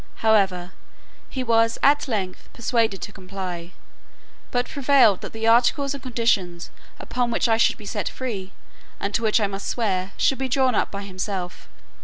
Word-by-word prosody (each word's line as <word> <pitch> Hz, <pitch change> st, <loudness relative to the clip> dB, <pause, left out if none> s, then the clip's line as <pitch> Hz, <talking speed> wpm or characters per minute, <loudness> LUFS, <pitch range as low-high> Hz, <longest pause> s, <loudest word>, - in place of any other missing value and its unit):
However, 190 Hz, -5 st, +3 dB, 0.6 s
he 260 Hz, -, -3 dB
was 230 Hz, -1 st, +3 dB
at 290 Hz, +1 st, +4 dB
length 195 Hz, -7 st, -3 dB
persuaded 225 Hz, -4 st, 0 dB
to 205 Hz, -, -6 dB
comply; 185 Hz, -3 st, -6 dB, 0.8 s
but 245 Hz, -1 st, 0 dB
prevailed 265 Hz, -8 st, +4 dB
that -, -, -7 dB
the 225 Hz, 0 st, -4 dB
articles 250 Hz, +5 st, +3 dB
and 280 Hz, -, -7 dB
conditions 220 Hz, -9 st, -1 dB, 0.3 s
upon 245 Hz, -1 st, -2 dB
which 235 Hz, -, +1 dB
I 225 Hz, -1 st, +3 dB
should 230 Hz, -, +3 dB
be 210 Hz, -, -12 dB
set 205 Hz, 0 st, -2 dB
free, 205 Hz, -7 st, -5 dB, 0.5 s
and 200 Hz, -, -3 dB
to 230 Hz, -, +1 dB
which 220 Hz, 0 st, +3 dB
I 210 Hz, -, +2 dB
must 195 Hz, 0 st, -5 dB
swear, 195 Hz, -4 st, -1 dB
should 270 Hz, -, +2 dB
be 265 Hz, -1 st, -2 dB
drawn 260 Hz, -1 st, +2 dB
up -, -, +1 dB
by 200 Hz, 0 st, -6 dB
himself. 185 Hz, -, -5 dB
220 Hz, 170 wpm, -23 LUFS, 190-245 Hz, 0.8 s, at